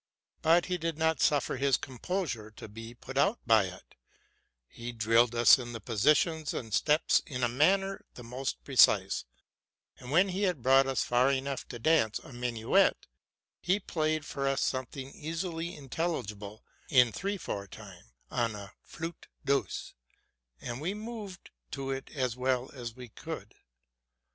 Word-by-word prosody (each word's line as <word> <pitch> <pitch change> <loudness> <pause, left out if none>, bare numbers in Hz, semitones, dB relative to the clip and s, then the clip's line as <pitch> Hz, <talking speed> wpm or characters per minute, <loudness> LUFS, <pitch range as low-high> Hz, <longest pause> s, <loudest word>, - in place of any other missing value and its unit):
But 170 +2 +4
he 180 -1 -2
did 165 -1 -2
not 160 -3 +1
suffer 145 -2 +2
his 135 0 +3
com 130 -3 -9
posure 155 - -2
to - - -9
be 115 +2 -10
put 135 +3 -5
out 200 +10 +3
by 110 -4 +5
it: 90 0 -10 0.7
he 120 - -7
drilled 115 +1 +3
us 120 +2 +7
in 120 -1 -6
the 115 - -5
positions 150 - +2
and 110 -3 -5
steps 150 +7 +3
in 125 -3 -4
a - - +4
manner 195 +10 +2
the 125 - -9
most 120 - -4
precise; - - +4 0.7
and, 125 - -10
when 180 +7 +4
he 185 +2 -3
had 180 - 0
brought 135 +1 +5
us 135 -1 +1
far 125 +3 +3
enough 135 0 -2
to 120 - -7
dance 115 -4 +2
a - - -12
minuet, 120 -2 +1 0.5
he 185 +3 +1
played 155 -4 -1
for 140 -1 -3
us 135 0 +1
something 130 +1 -3
easily 165 +1 -4
intelligible 125 - -4 0.3
in 125 -4 +5
three 200 - -3
four 100 - -5
time, - - -12 0.3
on 115 -3 0
a 100 -1 -9
flute 165 0 -8 0.2
douce, 135 -9 -1 0.7
and 120 - -6
we 180 +6 -2
moved 210 -4 -8 0.2
to 135 -1 -4
it 135 0 -5
as 130 -4 -1
well 130 0 0
as 120 -4 -7
we 125 -2 -10
could. - - -8
135 Hz, 160 wpm, -30 LUFS, 120-160 Hz, 0.7 s, us